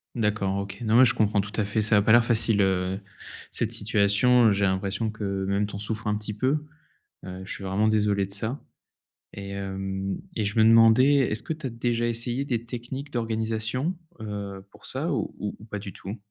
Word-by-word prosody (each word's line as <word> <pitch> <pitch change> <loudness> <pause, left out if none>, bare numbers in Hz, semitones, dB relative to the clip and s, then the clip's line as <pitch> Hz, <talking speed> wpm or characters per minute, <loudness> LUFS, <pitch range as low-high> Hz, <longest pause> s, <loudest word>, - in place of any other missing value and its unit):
D'accord, 105 -3 0
OK. 100 +1 -5
Non 110 0 +1
mais 130 - +8
je 120 - +3
comprends 105 -2 +2
tout 105 +1 -8
à - - 0
fait, 105 +2 0
ça 105 0 +3
a - - +5
pas 110 - +2
l'air 120 0 +6
facile, 110 -3 +2
heu, 95 0 +1 0.5
cette 115 -1 -1
situation, 110 +2 +3
heu, - - +5
j'ai 100 0 +2
l'impression 100 +3 -1
que 100 -3 -3
même 100 +1 0
tu 105 - -8
en 100 - -5
souffres 110 +1 -3
un 105 - +1
petit 105 0 -4
peu, 140 +7 0 0.6
heu, 95 0 -7
je - - -8
suis 100 - -6
vraiment 100 +3 +1
désolé 105 -2 +2
de - - -15
ça 115 +7 -3 0.7
et 100 0 -7
hem 95 0 -3 0.2
et 110 - 0
je 100 +2 -3
me 110 - +6
demandais, 115 +5 +6
est-ce 115 -4 0
que 160 - -2
tu 150 -3 -5
as - - -4
déjà 120 0 -1
essayé 120 +3 -2
des 120 -3 -2
techniques 125 +4 -6
d'organisation? 115 +6 -1 0.2
Heu, 100 -2 -6
pour - - -15
ça - - -2
ou - - -3
ou 105 - -4
ou 110 - -12
pas 105 -2 -5
du 100 -3 -8
tout? 100 +4 -7
110 Hz, 215 wpm, -26 LUFS, 100-115 Hz, 0.7 s, mais